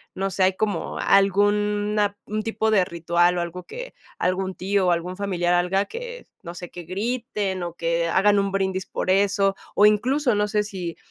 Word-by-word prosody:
No 195 +1 -2
sé, 190 +1 +1
¿hay 190 0 +4
como 210 +1 -2
algún 205 +1 +2
a 205 -1 +1
un 215 +1 -2
tipo 220 0 0
de 200 -4 +4
ritual, 175 0 +1
o - - 0
algo 170 +1 -5
que - - -8 0.2
algún 185 +1 -1
tío 195 0 0
o - - +4
algún 175 +2 -1
familiar 180 -3 0
haga, 180 +3 +2
que 485 - -8 0.2
no 170 -1 -8
sé 175 -1 -8
que 175 - -8
griten 205 0 -3
o 170 -1 -5
que 170 0 0
hagan 200 +3 +4
un 200 0 0
brindis 190 -1 -1
por 185 - -2
eso? 195 0 +2 0.2
O 205 - +6
incluso 245 +6 +3
no 205 0 +1
sé 210 0 +1
si 185 -5 -6
195 Hz, 195 wpm, -23 LUFS, 180-210 Hz, 0.2 s, O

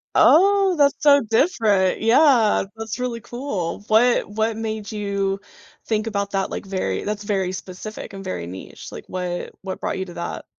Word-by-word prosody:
Oh, 390 +2 +5
that's 285 -2 +4
so 285 -1 +6
different. 220 - +2
Yeah, 235 -3 +4
that's 225 +1 -5
really 245 -2 -2
cool. 205 -9 -4
What 235 +3 +4
What 220 +1 -1
made 220 -1 -4
you 200 -2 -1 0.5
think 220 0 -1
about 200 -2 -2
that, 195 -1 -1
like, - - -5
very 185 - -2
that's 210 0 -3
very 190 -3 -1
specific, 190 +3 -8
and 195 0 -8
very 85 - -4
niche, 95 +1 -9
like, - - -9
what 180 -1 -4
what 190 -1 -5
brought - - -3
you 190 - -2
to 175 - -10
that? 170 - -5
210 Hz, 170 wpm, -22 LUFS, 190-235 Hz, 0.5 s, so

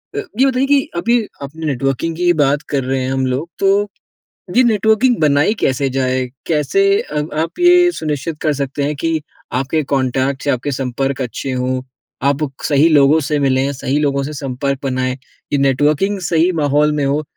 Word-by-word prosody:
अ, - - -4 0.2
ये 265 - +6
बताइए 265 0 +1
कि 285 0 +4 0.2
अभी 235 +8 +2 0.2
अपने 155 +4 -7
नेटवर्किंग 135 +3 -1
की 175 - -4
ही 175 - +5
बात 145 -2 +2
कर 140 -2 0
रहे 130 +1 -1
हैं 130 - -2
हम 135 0 0
लोग, 135 +6 -2
तो 200 +1 +2 0.7
ये 255 - +7
नेटवर्किंग 220 +2 +3
बनाई 150 +6 +3
कैसे 135 +1 +1
जाए? 130 -1 0 0.2
कैसे 160 - +1 0.2
अ, 150 - -3 0.2
आप 165 +1 -3
ये 355 0 +6
सुनिश्चित 155 - -4
कर 155 - +2
सकते 140 0 -3
हैं 150 +1 -1
कि 160 +2 -1 0.4
आपके 145 +4 -1
कॉन्टेक्ट्स 135 +1 0
या 140 - +3
आपके 135 +4 -4
संपर्क 135 +1 -2
अच्छे 130 +2 -4
हों, 130 0 -1 0.5
आप 145 +1 0 0.2
सही 145 +2 +4
लोगों 150 0 +5
से 150 - +1
मिलें 135 0 +1
सही 140 +1 -2
लोगों 140 -2 0
से 145 +2 -5
संपर्क 140 -1 -3
बनाएँ? 130 -1 -1 0.4
ये 145 - +2
नेटवर्किंग 145 +9 +1
सही 170 +1 +3
माहौल 150 +1 +2
में 150 -1 -1
हो 140 +2 0
145 Hz, 185 wpm, -17 LUFS, 135-165 Hz, 0.7 s, ये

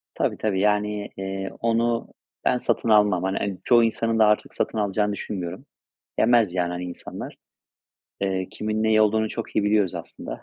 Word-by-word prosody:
Tabii, - - 0
tabii. 105 -3 0
Yani, 105 0 +1
eee, 95 0 -4
onu 115 0 +1 0.4
ben - - +3
satın 120 -1 -1
almam. 105 -4 +4
Hani, 95 0 -1
çoğu 120 -1 +5
insanın 115 0 0
da 110 - +7
artık, 105 0 +1
satın - - -2
alacağını 105 0 0
düşünmüyorum. 90 -3 -5 0.5
Yemez, 115 -6 +4
yani, 90 -1 +1
hani 90 0 -4
insanlar. 90 -1 -7 0.9
Eee, 95 -1 -1
kimin 110 0 -2
neyi 110 0 +4
olduğunu 110 +1 +3
çok 115 +1 -6
iyi 105 - +3
biliyoruz, 105 -3 +2
aslında. - - -7
105 Hz, 160 wpm, -24 LUFS, 95-110 Hz, 0.9 s, da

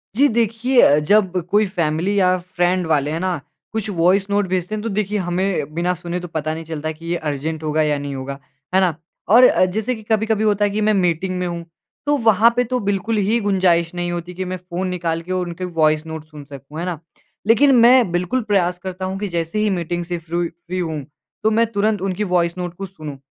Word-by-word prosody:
जी 280 +5 +5
देखिए 235 +3 +3
अ, 145 - +6
जब 195 +5 +3 0.2
कोई 210 +1 +4
फ़ैमिली 180 +2 0
या 185 -1 +3
फ़्रेंड 180 0 0
वाले, 150 -2 +1
हैं 160 - -2
ना? 185 -2 -1 0.3
कुछ 220 -1 -2
वॉइस 180 +4 +3
नोट 200 -1 +1
भेजते 185 +3 -2
हैं 215 - -4
तो 230 - -3
देखिए 210 0 -1
हमें 175 -4 -1
बिना 175 +2 +1
सुने 175 0 -4
तो 175 - -7
पता 155 -2 -3
नहीं 165 +1 -6
चलता 155 -1 -4
कि 160 +1 -12
ये 170 +1 -1
अर्जेंट 155 +3 -4
होगा 155 0 +1
या 150 -1 +1
नहीं 140 0 -5
होगा, 135 +1 -5 0.4
है - - +6
ना? 180 -5 +2 0.3
और 235 +5 +7
अ, 185 - +3
जैसे 220 +7 -2
कि 220 - -11
कभी-कभी 220 0 +1
होता 210 -1 +2
है 205 - 0
कि 210 +2 -1
मैं 215 0 +3
मीटिंग 185 -1 0
में 180 - -1
हूँ 170 -1 -5 0.4
तो 290 0 +3
वहाँ 220 +2 +6
पे 245 - +3
तो 250 +1 -2
बिल्कुल 205 +3 0
ही 230 +3 +2
गुंजाइश 175 -3 +2
नहीं 175 0 -2
होती 175 +1 -5
कि 185 +1 -4
मैं 185 0 -4
फ़ोन 180 +1 -4
निकाल 170 -2 -2
के 175 +2 -8
और 185 -1 0
उनके 175 +2 -5 0.2
वॉइस 155 0 +3
नोट 160 -1 -7
सुन 155 -2 -11
सकूँ। 140 +2 -10
है 175 - -2
ना? 175 -4 -3 0.5
लेकिन 275 +5 +5
मैं 240 -3 +6
बिल्कुल 180 +9 0
प्रयास 185 -4 +1
करता 185 0 -5
हूँ 190 +1 -3
कि 205 - -2
जैसे 170 +2 -2
ही 215 0 +2
मीटिंग 175 -2 -2
से 175 0 -3
फ़्रोइ 170 +1 -2
फ़्री 175 +2 -7
हूँ, 160 -5 -3 0.4
तो 220 - +3
मैं 230 +2 +3
तुरंत 210 -1 0
उनकी 195 +1 -1
वॉइस 170 0 +1
नोट 180 -1 -4
को 195 - -4
सुनूँ 155 -7 -9
180 Hz, 230 wpm, -20 LUFS, 165-205 Hz, 0.5 s, और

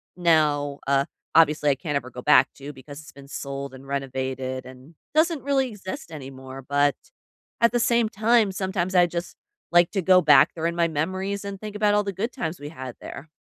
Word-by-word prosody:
now, 150 -5 +2
uh, 140 0 +3 0.3
obviously, 150 -2 +4
I - - +1
can't 145 +1 -4
ever 130 -2 -2
go 125 - -8
back 150 - +5
to 140 +1 -8
because 140 +3 -11
it's 150 - -14
been 140 -1 -14
sold 140 -1 -6
and 135 +1 -12
renovated 130 -1 -3
and 130 +5 -14 0.2
doesn't 320 -1 +2
really 270 -2 +1
exist 190 - -8
anymore, 135 -2 -9
but 145 0 +2 0.7
at 235 - +5
the 240 - +1
same 235 -1 +2
time, 220 0 +2
sometimes 190 -1 -2
I 175 -1 +6
just 170 +1 -5 0.4
like 175 0 +5
to 195 - -1
go 185 +1 +6
back 150 -1 +6
there 160 - -3
in 170 - -2
my 170 -1 +2
memories 190 +6 -3
and 200 -1 -6
think 210 -1 -8
about 210 0 +2
all 210 - +2
the 200 -1 -4
good 220 +7 -3
times 160 -4 -4
we 145 +1 -7
had 130 -5 -8
there. 140 +4 -9
160 Hz, 205 wpm, -24 LUFS, 140-195 Hz, 0.7 s, I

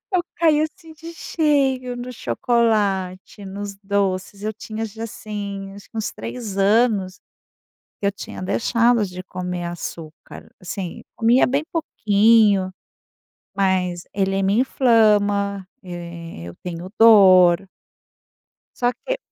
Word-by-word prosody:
Eu 355 - +3
caí, 310 -3 +3
assim, 315 +1 -6
de 330 +2 -10
cheio 270 -7 0
no 250 +1 -6
chocolate, 200 - 0
nos 200 +1 -6
doces. 195 0 -2
Eu 215 0 -2
tinha, 220 +1 -5
já, 225 +2 -6
assim, 200 -3 -6
acho 200 - -13
que 225 - -10
uns 220 - -2
3 225 -6 -6
anos, 200 -2 +2 0.8
que 200 - 0
eu - - +2
tinha 195 - -9
deixado 230 +3 +2
de 185 0 -7
comer 180 -1 -5
açúcar, 165 -2 -8
assim, 180 -1 -6
comia 235 +3 +4
bem 280 +4 0
pouquinho, 210 - +3 0.9
mas 185 -3 0
ele 195 0 0
me 200 +4 +2
inflama, 205 -6 +2 0.2
e 170 - -8
eu 85 - -10
tenho 180 +2 -7
dor. 190 -5 +7 1.1
Só 245 0 +2
que, - - -1
200 Hz, 120 wpm, -21 LUFS, 185-230 Hz, 1.1 s, dor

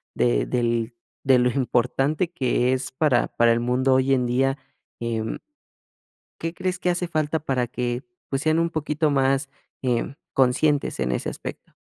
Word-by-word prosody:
de - - +2
del, 120 - 0 0.3
de 130 -1 +5
lo 125 0 +3
importante 135 +6 0
que 125 -3 +1
es 130 0 -2
para 130 -2 +2
para 120 0 +3
el 115 - +2
mundo 125 +2 +2
hoy 130 +1 +3
en 125 -1 0
día? 135 +3 +1 0.4
Em 115 -1 -2 1.0
¿qué 165 +1 -3
crees 185 -1 -2
que 180 - 0
hace 175 0 0
falta 155 -1 0
para 130 -5 -1
que, 120 0 -2 0.3
pues, 135 0 -1
sean 155 +1 +2
un 170 0 +1
poquito 150 -1 0
más, 135 0 +2 0.4
eh, 125 +2 0 0.2
conscientes 135 - +2
en 65 -1 0
ese - - -2
aspecto? - - -8
130 Hz, 160 wpm, -24 LUFS, 120-150 Hz, 1.0 s, de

